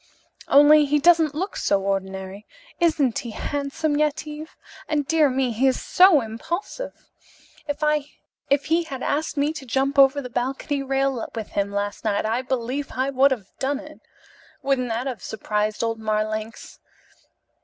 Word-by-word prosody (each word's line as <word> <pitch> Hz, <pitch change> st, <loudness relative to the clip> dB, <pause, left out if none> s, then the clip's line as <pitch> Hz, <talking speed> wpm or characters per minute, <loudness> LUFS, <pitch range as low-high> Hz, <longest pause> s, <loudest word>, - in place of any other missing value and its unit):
Only 295 Hz, +1 st, +7 dB
he 295 Hz, +1 st, +2 dB
doesn't 320 Hz, -1 st, +4 dB
look 375 Hz, +6 st, -3 dB
so 195 Hz, -1 st, +1 dB
ordinary. 190 Hz, +1 st, -4 dB, 0.3 s
Isn't 305 Hz, -8 st, +2 dB
he 240 Hz, -, -7 dB
handsome, 285 Hz, +5 st, -2 dB
Yetive? 305 Hz, +1 st, -2 dB, 0.3 s
And, 295 Hz, -2 st, 0 dB
dear 310 Hz, -1 st, +3 dB
me, 260 Hz, -1 st, 0 dB
he 245 Hz, +4 st, +2 dB
is 260 Hz, -, +1 dB
so 365 Hz, -5 st, +5 dB
impulsive! 340 Hz, -, -6 dB, 0.6 s
If 290 Hz, -1 st, -2 dB
he 330 Hz, +2 st, +2 dB
had 270 Hz, -4 st, -6 dB
asked 305 Hz, +1 st, -1 dB
me 290 Hz, +2 st, +1 dB
to 310 Hz, -, -8 dB
jump 270 Hz, +3 st, 0 dB
over 275 Hz, +1 st, +6 dB
the 265 Hz, -, -5 dB
balcony 270 Hz, +3 st, -2 dB
rail 270 Hz, -2 st, 0 dB
with 220 Hz, -2 st, -5 dB
him 200 Hz, 0 st, -1 dB
last 205 Hz, 0 st, -3 dB
night, 210 Hz, -2 st, 0 dB
I 225 Hz, +3 st, 0 dB
believe 260 Hz, +2 st, -3 dB
I 260 Hz, +2 st, -1 dB
would 270 Hz, +1 st, +4 dB
have 225 Hz, -8 st, -5 dB
done 275 Hz, +1 st, 0 dB
it. 300 Hz, +2 st, -11 dB, 0.6 s
Wouldn't 260 Hz, -3 st, 0 dB
that 230 Hz, +3 st, -2 dB
have 250 Hz, -8 st, -4 dB
surprised 210 Hz, 0 st, -2 dB
old 225 Hz, -1 st, -1 dB
Marlanx?" 215 Hz, 0 st, -3 dB
270 Hz, 155 wpm, -23 LUFS, 225-295 Hz, 0.6 s, Only